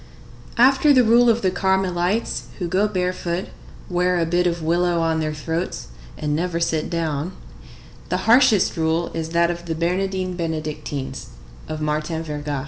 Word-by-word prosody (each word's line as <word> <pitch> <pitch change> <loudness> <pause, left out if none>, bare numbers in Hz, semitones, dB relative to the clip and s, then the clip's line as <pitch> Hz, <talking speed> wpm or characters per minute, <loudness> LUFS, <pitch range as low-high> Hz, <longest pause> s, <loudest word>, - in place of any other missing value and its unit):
After 270 +4 +5
the 255 -3 +6
rule 235 +1 +5
of 230 -1 +2
the 185 - +2
Carmelites, 190 +2 0
who 180 - -3
go 190 +4 +2
barefoot, 180 -2 -2 0.4
wear 180 0 +1
a 165 - +1
bit 175 +2 +1
of 170 -1 -2
willow 170 +1 +1
on 165 -1 +1
their 155 -1 -1
throats, 160 - -4 0.3
and 150 -1 -1
never 170 +1 -1
sit 160 -2 -1
down, 165 0 -2 0.8
the 185 +1 -2
harshest 230 -6 +4
rule 165 +1 0
is 160 -1 -3
that 170 +1 +2
of 170 0 -7
the 165 - -2
Bernardines 185 +2 -1
Benedictines 155 -4 -4 0.4
of 155 0 -5
Martin 155 +2 -2
Verga. 145 -2 -4
170 Hz, 155 wpm, -22 LUFS, 160-185 Hz, 0.8 s, the